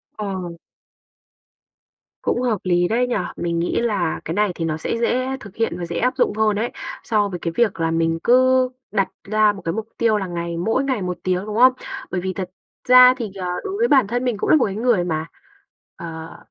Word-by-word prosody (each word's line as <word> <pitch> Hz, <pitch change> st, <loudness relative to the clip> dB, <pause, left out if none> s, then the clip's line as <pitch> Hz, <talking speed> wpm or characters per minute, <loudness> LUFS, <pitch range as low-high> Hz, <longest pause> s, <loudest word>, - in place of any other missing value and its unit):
Ờ. 210 Hz, -1 st, -4 dB, 2.0 s
Cũng 240 Hz, -, 0 dB
hợp 240 Hz, -4 st, +1 dB
lý 175 Hz, -1 st, +2 dB
đấy 240 Hz, +4 st, +1 dB
nhỉ. 245 Hz, -, -1 dB, 0.2 s
Mình 170 Hz, -1 st, -1 dB
nghĩ 170 Hz, -, 0 dB
là 200 Hz, -8 st, 0 dB
cái 160 Hz, -, -3 dB
này 210 Hz, +1 st, +1 dB
thì 165 Hz, -, -3 dB
nó 155 Hz, -1 st, -1 dB
sẽ 160 Hz, -, -3 dB
dễ 250 Hz, +2 st, 0 dB
thực 205 Hz, -3 st, -12 dB
hiện 225 Hz, -6 st, -1 dB
và 175 Hz, -, -3 dB
dễ 170 Hz, 0 st, -4 dB
áp 250 Hz, +2 st, +1 dB
dụng 250 Hz, -, +2 dB
hơn 215 Hz, -1 st, +2 dB
đấy, 225 Hz, +4 st, -2 dB, 0.3 s
so 210 Hz, -3 st, +1 dB
với 180 Hz, -2 st, -5 dB
cái 170 Hz, -, -3 dB
việc 225 Hz, -6 st, +1 dB
là 165 Hz, 0 st, 0 dB
mình 165 Hz, 0 st, 0 dB
cứ 255 Hz, +1 st, +4 dB, 0.2 s
đặt 195 Hz, -3 st, +1 dB, 0.2 s
ra 215 Hz, 0 st, +3 dB
một 195 Hz, -, -10 dB
cái 165 Hz, -, -1 dB
mục 220 Hz, 0 st, -4 dB
tiêu 225 Hz, -2 st, +2 dB
là 195 Hz, -2 st, -3 dB
ngày 170 Hz, -1 st, -4 dB
mỗi 225 Hz, +9 st, 0 dB
ngày 260 Hz, -6 st, -1 dB
1 180 Hz, -1 st, -3 dB
tiếng, 185 Hz, +1 st, 0 dB
đúng 210 Hz, 0 st, -4 dB
không? 255 Hz, +2 st, +7 dB, 0.4 s
Bởi 180 Hz, -, -1 dB
vì 185 Hz, +1 st, -3 dB
thật 185 Hz, -1 st, -5 dB, 0.4 s
ra 250 Hz, 0 st, +9 dB
thì, 225 Hz, -5 st, -4 dB
ờ, 190 Hz, -2 st, -5 dB, 0.2 s
đối 395 Hz, +1 st, -4 dB
với 470 Hz, +2 st, +2 dB
bản 265 Hz, -, +4 dB
thân 245 Hz, +4 st, -2 dB
mình 245 Hz, -4 st, -1 dB
cũng -, -, -2 dB
là -, -, +7 dB
một 290 Hz, -, +3 dB
cái 195 Hz, -, -4 dB
người 225 Hz, -4 st, +2 dB
mà, 160 Hz, -2 st, -2 dB, 0.7 s
ờ, 160 Hz, -1 st, -8 dB
210 Hz, 225 wpm, -21 LUFS, 175-240 Hz, 2.0 s, ra